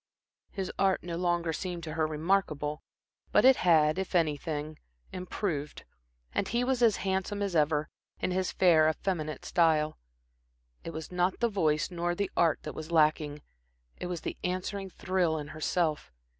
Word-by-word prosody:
His 190 -2 -4
art 190 -1 +2
no 170 -1 -4
longer 175 -1 0
seemed 175 0 -4
to 155 -1 -5
her 160 -1 +1
remarkable, 155 -2 0 0.5
but - - +5
it 265 0 +7
had, 160 -1 +4
if 190 -1 -3
anything, 155 -1 -1 0.3
improved, 175 -5 -4 0.5
and 195 - 0
he 240 +1 0
was 255 -1 0
as 225 -4 +5
handsome 190 +2 -1
as 195 -3 -2
ever, 150 0 +2 0.3
in - - -1
his 185 0 0
fair, 160 -4 +5
effeminate 155 -2 -3
style. 160 -3 +2 0.8
It - - -5
was 160 0 -7
not 180 +1 0
the 235 - +2
voice 155 -6 +1
nor 175 0 -1
the 200 +1 -2
art 165 -3 +2
that 150 - -5
was 155 +1 -7
lacking. 150 -2 +2 0.5
It - - -5
was 175 -2 -4
the - - -5
answering 185 +2 -3
thrill 185 -3 0
in 150 -1 -6
herself. 155 0 -1
170 Hz, 160 wpm, -30 LUFS, 155-185 Hz, 0.8 s, it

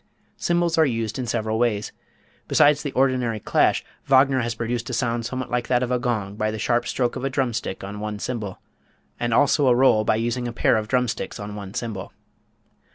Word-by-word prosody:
Cymbals 170 -1 +1
are 160 - +6
used 115 -2 -2
in 125 - -3
several 110 0 -1
ways. 110 -4 0 0.6
Besides 145 0 +4
the 145 - -4
ordinary 125 -4 +1
clash, - - +2 0.2
Wagner 135 0 +5
has 120 -1 -2
produced 120 +1 -3
a - - -4
sound 115 -1 -1
somewhat 130 -1 -5
like 120 -1 -1
that 125 0 +2
of 125 - -2
a 125 - +1
gong, 110 -6 -2
by 110 0 0
the 110 - -4
sharp 120 +2 0
stroke 125 -2 -1
of - - -5
a 135 - 0
drum 130 -3 0
stick 95 - -4
on 100 +1 -6
one 105 0 -4
cymbal, 105 -4 -4 0.6
and 120 0 -1
also 140 +4 +3
a 125 - +5
roll 120 -4 +4
by 110 - +2
using 120 +2 -1
a 120 - -5
pair 120 - +3
of 110 -1 -1
drum 125 +1 +2
sticks 115 - -4
on 105 0 -6
one 100 -1 -8
cymbal. 110 -5 -5
120 Hz, 215 wpm, -23 LUFS, 110-130 Hz, 0.6 s, are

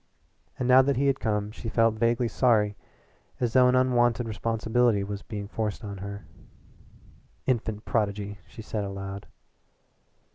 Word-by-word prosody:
And 125 - -1
now 130 +1 +8
that 135 -1 +1
he 140 - +1
had 135 -1 +2
come 105 -2 -1
she 115 - -6
felt 115 -1 +3
vaguely 115 +2 +1
sorry 110 -4 +2 0.6
as 120 -3 -1
though 130 -1 +6
an 125 - +3
unwonted 120 -2 +2
responsibility 115 0 +1
was 100 0 -5
being 105 -2 -6
forced 110 -1 -3
on 100 -2 -6
her. 100 +1 -7 1.2
"Infant 110 -4 -1
prodigy!" 100 -2 -1
she 110 - -11
said 105 -1 -3
aloud. 100 0 -6
110 Hz, 145 wpm, -27 LUFS, 100-120 Hz, 1.2 s, now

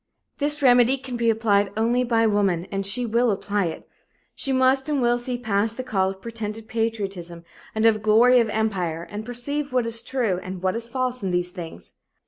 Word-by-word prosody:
This 295 0 0
remedy 245 0 +5
can 260 -1 -7
be 235 -1 +1
applied 210 -3 +2
only 235 +3 +2
by 230 -2 +2
woman 200 -5 +1
and 195 -1 -1
she 240 +5 +1
will 235 +2 +2
apply 200 -1 -1
it. 165 - -6 0.5
She 275 - -2
must 265 +2 +2
and 290 -2 +1
will 240 -1 +2
see 245 0 -3
past 220 -1 -1
the 255 - -3
call 190 -6 0
of 190 0 -9
pretended 225 -1 -6
patriotism 195 -7 -3 0.3
and 220 +1 +1
of 215 -2 +4
glory 230 +4 +5
of 230 -2 +1
empire 185 -7 -2
and 210 +1 -5
perceive 265 +5 -3
what 250 -2 +1
is 230 0 0
true 235 -9 -1
and 185 0 -7
what 185 +1 +1
is 230 0 -3
false 255 0 -2
in 195 - -2
these 180 0 0
things. 160 - -9
225 Hz, 200 wpm, -24 LUFS, 200-245 Hz, 0.5 s, remedy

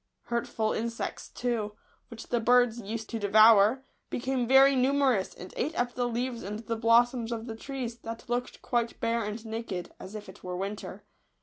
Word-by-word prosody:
Hurt 235 0 -2
ful 220 -1 -1
insects, 230 +1 -4
too, 230 -4 -2 0.3
which 230 -1 -10
the 240 - +1
birds 245 0 +4
used 220 +2 -5
to 230 - -2
devour, 215 +3 +6 0.3
became 250 -1 -1
very 270 +2 +7
numerous, 260 -5 +2
and 180 - -10
ate 305 +5 -2
up 245 0 0
the 245 0 -1
leaves 240 0 -2
and 205 +3 -5
the 230 +1 -4
blossoms 230 +1 +3
of 230 -1 -3
the 225 -2 -6
trees, 240 -1 -5
that 230 0 -8
looked 245 +1 -3
quite 235 -2 -1
bare 230 0 0
and 210 +2 -5
naked, 220 -5 -5
as 195 +3 -9
if 210 -1 -7
it 190 - -13
were 180 0 -4
winter. 200 +3 -5
230 Hz, 185 wpm, -29 LUFS, 220-245 Hz, 0.3 s, very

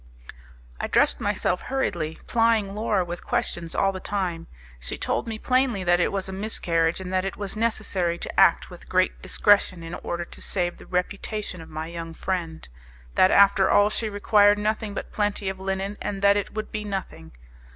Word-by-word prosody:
I - - -2
dressed - - +3
myself - - 0
hurriedly, 170 -12 -2
plying 225 -4 +2
Laura 210 -3 0
with 175 0 -6
questions 195 -9 -2
all 195 - +2
the 190 - -6
time. 185 -5 -3 0.3
She - - -5
told - - -2
me 220 -1 -4
plainly 255 -4 +1
that 175 0 +3
it - - +2
was 195 -1 -2
a 190 - -6
miscarriage, 170 -5 0
and 185 0 -6
that 185 0 +2
it 195 - -4
was 200 0 -4
necessary 210 -6 0
to - - -3
act - - +4
with - - -13
great - - +1
discretion 190 - +2
in 165 +1 -7
order 175 0 -4
to - - -12
save 175 -2 -1
the - - -13
reputation 185 +1 -2
of 160 - -12
my 155 +1 -5
young 165 0 -7
friend; 170 -4 -3 0.5
that 185 - +5
after 195 -1 +5
all 205 +1 +4
she 220 0 -1
required 205 0 +4
nothing 210 0 -2
but - - -5
plenty 205 -2 -1
of 190 0 -6
linen, 195 +1 -3
and 200 -1 -4
that 200 0 +6
it 205 - -2
would 215 0 -5
be 210 -1 -3
nothing. 190 - -6
195 Hz, 190 wpm, -25 LUFS, 175-210 Hz, 0.5 s, that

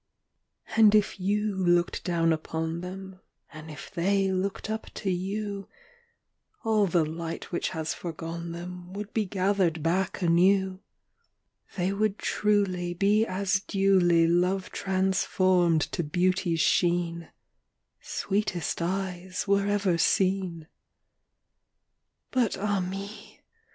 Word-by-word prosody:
V. 225 - 0
And 215 -1 +7
if 210 -1 +2
you 205 +2 0
looked 175 -2 +1
down 165 -2 +2
upon 160 +1 -3
them, 190 +1 -8 0.3
And 155 0 -10
if 155 +5 -9
they 195 +2 +1
looked 190 +2 -2
up 220 +1 -4
to 195 - -2
you, 200 +2 -3 1.0
All 215 -2 +3
the 170 -2 +2
light 165 +1 -6
which 175 - -1
has 160 -3 -3
foregone 170 0 -6
them 180 +1 -8
Would 205 +1 -6
be 220 -2 +1
gathered 185 -4 0
back 185 +3 0
anew: 185 +2 +3 1.0
They 185 +1 0
would 210 0 0
truly 185 -4 0
Be 205 +4 +3
as 195 +1 0
duly 190 -4 +3
Love 180 +3 +1
transformed 185 -3 +2
to - - -1
beauty's 175 +1 +1
sheen, 170 0 +1 0.7
"Sweetest 195 -5 -2
eyes 185 +1 -3
were 200 0 +2
ever 200 -4 +1
seen." 185 -2 +1
VI. - - -24 1.6
But, 245 -5 +1
ah 205 0 0
me! 195 +3 -7
185 Hz, 120 wpm, -27 LUFS, 170-200 Hz, 1.6 s, And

